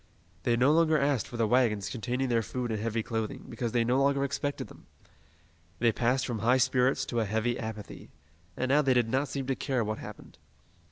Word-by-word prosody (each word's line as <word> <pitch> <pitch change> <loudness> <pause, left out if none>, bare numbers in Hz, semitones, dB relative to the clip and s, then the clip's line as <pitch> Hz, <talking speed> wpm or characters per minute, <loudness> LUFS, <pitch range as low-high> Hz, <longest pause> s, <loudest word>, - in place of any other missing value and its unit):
They 120 -1 +1
no 130 +4 +4
longer 160 0 +4
asked 140 -5 +1
for 120 - -8
the 115 - +2
wagons 110 -4 +2
containing 125 +3 -2
their 115 -1 +2
food 120 +2 -4
and 110 - -2
heavy 115 0 -1
clothing, 110 -2 -4
because 120 -1 -3
they 120 0 +2
no 125 +3 +2
longer 140 0 +2
expected 140 +1 -2
them. - - -16 0.9
They 115 +3 +3
passed 125 +4 +1
from 120 -4 -3
high 120 +4 +3
spirits 130 +1 +2
to 120 - -2
a 110 - +1
heavy 110 +4 -1
apathy, 110 -2 -7 0.5
and 130 - -1
now 145 +2 +5
they 135 -3 +2
did 120 -2 +2
not 135 +4 +1
seem 135 -1 -4
to 135 0 -1
care 130 -3 -1
what 110 0 -3
happened. - - -11
125 Hz, 210 wpm, -29 LUFS, 115-135 Hz, 0.9 s, now